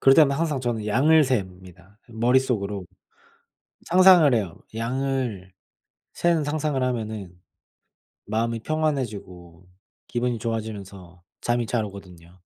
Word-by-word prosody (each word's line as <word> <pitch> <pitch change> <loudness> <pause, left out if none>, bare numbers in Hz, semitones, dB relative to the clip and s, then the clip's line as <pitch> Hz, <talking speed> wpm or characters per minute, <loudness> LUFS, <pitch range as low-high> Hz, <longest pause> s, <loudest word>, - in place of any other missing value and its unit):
그럴 135 - +6
때마다 140 -2 +5
항상 155 -5 -1
저는 115 -4 -2
양을 150 +8 +4
셉니다 95 -4 -5
머릿속으로. 115 -4 0 1.0
상상을 180 -6 +6
해요. 100 -8 -1 0.2
양을 120 -4 -2 0.6
세는 170 -3 +1
상상을 145 -2 -1
하면은 110 -6 -3 1.0
마음이 115 +2 -1
평안해지고 100 - -3 0.4
기분이 120 -1 -1
좋아지면서 100 -6 -6 0.2
잠이 120 0 0
잘 110 -1 -1
오거든요. 90 -3 -12
115 Hz, 270 characters per minute, -24 LUFS, 100-135 Hz, 1.0 s, 그럴